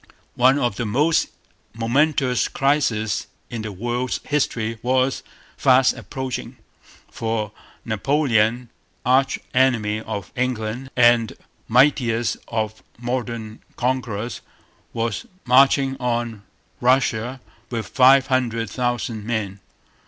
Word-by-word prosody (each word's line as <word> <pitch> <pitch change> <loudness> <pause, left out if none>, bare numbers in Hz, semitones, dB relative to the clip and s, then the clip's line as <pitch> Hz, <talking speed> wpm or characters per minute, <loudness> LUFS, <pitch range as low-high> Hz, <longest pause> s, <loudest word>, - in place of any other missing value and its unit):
One 130 +3 +4
of 120 -7 0
the 120 - -2
most 150 +9 +2 0.5
momentous 130 +2 +1
crises 115 -7 0 0.2
in 115 -2 -4
the 110 -1 -5
world's 120 +5 -2
history 115 -6 -1
was 130 +1 +1 0.4
fast 130 0 +5
approaching; 130 +1 -6 0.5
for 110 -2 -2 0.3
Napoleon, 120 -1 +1 0.4
arch 130 +2 +3 0.2
enemy 115 -5 +2
of 105 -4 -6
England 125 0 -2
and 120 -2 +4 0.3
mightiest 120 -2 +3
of 110 -1 -3 0.2
modern 120 -2 -4
conquerors, 120 -3 -2 0.5
was 115 -3 -3 0.2
marching 135 +1 +4
on 120 -4 -2 0.3
Russia 125 -1 +1 0.3
with 115 -2 -3
five 135 +1 +5
hundred 115 -5 -1
thousand 120 -3 -2
men. 105 -4 -3
120 Hz, 100 wpm, -22 LUFS, 110-130 Hz, 0.5 s, fast